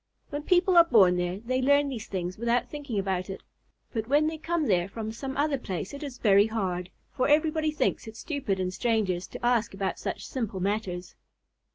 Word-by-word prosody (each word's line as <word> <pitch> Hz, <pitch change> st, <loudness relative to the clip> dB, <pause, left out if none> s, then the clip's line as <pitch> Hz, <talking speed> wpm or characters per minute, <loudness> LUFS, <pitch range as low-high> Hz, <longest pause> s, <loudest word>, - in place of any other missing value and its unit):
When 290 Hz, 0 st, -3 dB
people 360 Hz, +2 st, +3 dB
are 340 Hz, -, +10 dB
born 195 Hz, -, +5 dB
there, 180 Hz, +2 st, -2 dB
they 255 Hz, +3 st, -1 dB
learn 285 Hz, +2 st, +4 dB
these 235 Hz, -5 st, -6 dB
things 180 Hz, -1 st, -3 dB
without 235 Hz, +1 st, +1 dB
thinking 285 Hz, -7 st, -5 dB
about 190 Hz, -1 st, -1 dB
it, 190 Hz, -, -7 dB, 0.5 s
but 220 Hz, -2 st, -2 dB
when 290 Hz, +3 st, +3 dB
they 315 Hz, 0 st, -2 dB
come 325 Hz, 0 st, -1 dB
there 180 Hz, -5 st, +2 dB
from 220 Hz, +1 st, -5 dB
some 265 Hz, +4 st, -6 dB
other 290 Hz, -1 st, +1 dB
place 190 Hz, -2 st, -5 dB
it 280 Hz, -, -7 dB
is 280 Hz, -4 st, -6 dB
very 200 Hz, -1 st, +5 dB
hard, 185 Hz, -5 st, -2 dB, 0.3 s
for 255 Hz, -, +1 dB
everybody 310 Hz, +1 st, +2 dB
thinks 300 Hz, -6 st, -1 dB
it 220 Hz, 0 st, -9 dB
stupid 255 Hz, -, -2 dB
in 185 Hz, -1 st, -1 dB
strangers 195 Hz, -4 st, 0 dB
to -, -, -7 dB
ask 235 Hz, -4 st, +2 dB
about 195 Hz, -1 st, -2 dB
such -, -, -4 dB
simple 225 Hz, -7 st, -3 dB
matters. 185 Hz, -2 st, -2 dB
225 Hz, 200 wpm, -27 LUFS, 190-285 Hz, 0.5 s, are